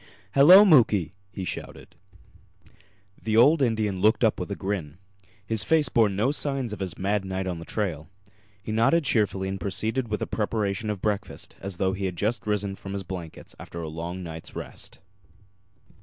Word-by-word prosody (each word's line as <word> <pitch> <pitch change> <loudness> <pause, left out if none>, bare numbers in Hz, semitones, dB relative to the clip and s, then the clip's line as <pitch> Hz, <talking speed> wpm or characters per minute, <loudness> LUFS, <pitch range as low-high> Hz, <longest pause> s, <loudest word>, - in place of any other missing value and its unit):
"Hello, 180 +9 +9
Muky!" 105 - +4 0.2
he 95 0 -6
shouted. - - -7 1.3
The 110 0 0
old 145 +6 +6
Indian 110 -6 0
looked 110 +3 +3
up 110 - +2
with - - -4
a 100 - -3
grin. 90 -7 -4 0.5
His 110 0 0
face 155 -4 +3
bore 115 -4 +3
no 105 +7 +1
signs 135 -6 -1
of - - -7
his 95 -4 -4
mad 100 +1 0
night 95 0 -3
on 90 -3 -3
the 85 - -9
trail. 85 -8 -3 0.5
He 110 - -5
nodded 115 +10 +3
cheerfully 105 -7 0
and 95 0 -4
proceeded 110 +6 -2
with 105 -1 -2
the - - -2
preparation 105 -1 -2
of 105 -3 -4
breakfast 105 -2 -3
as 100 -2 -5
though 95 0 +1
he 95 0 -3
had 90 -2 -3
just 110 +6 -2
risen 105 -2 0
from 95 0 -8
his 100 -1 -4
blankets 85 -3 -8
after 85 - -8
a 80 - -5
long 85 +3 -5
night's 80 -1 -9
rest. - - -8
100 Hz, 180 wpm, -26 LUFS, 95-115 Hz, 1.3 s, Hello